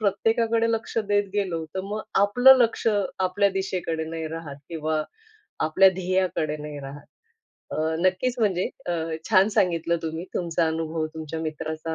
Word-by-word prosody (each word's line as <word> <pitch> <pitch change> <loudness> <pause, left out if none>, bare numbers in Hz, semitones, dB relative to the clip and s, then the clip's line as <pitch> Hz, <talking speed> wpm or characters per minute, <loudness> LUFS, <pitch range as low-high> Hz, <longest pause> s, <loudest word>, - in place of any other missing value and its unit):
प्रत्येकाकडे 225 +3 +1
लक्ष 225 0 -3
देत 205 -1 +2
गेलो 180 -6 -1
तर 190 - -1
मग 210 +2 -4 0.2
आपलं 245 +6 +7
लक्ष 230 -1 +1 0.3
आपल्या 190 +2 +2
दिशेकडे 185 -4 -2
नाही 160 0 -5
राहत 160 -3 -7
किंवा 155 -1 -1 0.6
आपल्या 190 +5 +6
ध्येयाकडे 185 -4 0
नाही 150 -1 -7
राहत. 140 +1 -9 0.6
अ, - - -4 0.2
नक्कीच 185 +8 +1
म्हणजे 190 -5 +1 0.2
अ, 175 - 0 0.4
छान 195 0 +6
सांगितलं 170 -1 +2
तुम्ही 160 +2 -4
तुमचा 170 -1 0
अनुभव, 160 0 -2
तुमच्या 160 0 -5
मित्राचा 160 +1 -4
175 Hz, 140 wpm, -25 LUFS, 160-200 Hz, 0.6 s, आपलं